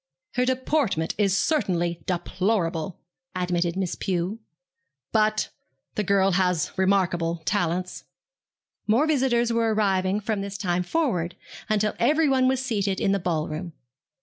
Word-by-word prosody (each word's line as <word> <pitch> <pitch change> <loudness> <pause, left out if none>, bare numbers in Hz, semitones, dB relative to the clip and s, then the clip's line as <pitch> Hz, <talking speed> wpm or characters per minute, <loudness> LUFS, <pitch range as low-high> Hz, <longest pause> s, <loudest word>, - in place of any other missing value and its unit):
'Her 250 0 +1
deportment 255 - 0
is 195 -2 +3
certainly 175 - 0
deplorable,' 180 -2 -1 0.4
admitted 175 -1 0
Miss 190 -3 -1
Pew; 185 +3 -2 0.7
'but 215 -1 +2 0.4
the 210 - -1
girl 195 -1 +3
has 180 -3 +1
remarkable 175 -4 +1
talents.' 180 -1 -1 0.8
More 230 +8 +4
visitors 250 -6 +2
were 225 -1 +2
arriving 195 -1 +1
from 210 -1 -2
this 200 0 -5
time 180 -2 0
forward, 180 - -1 0.3
until 215 0 +1
everyone 270 -1 +3
was 260 0 +1
seated 200 -5 0
in 195 - +2
the 200 - +2
ball 165 -4 -1
room. 160 +2 -5
195 Hz, 125 wpm, -25 LUFS, 175-225 Hz, 0.8 s, More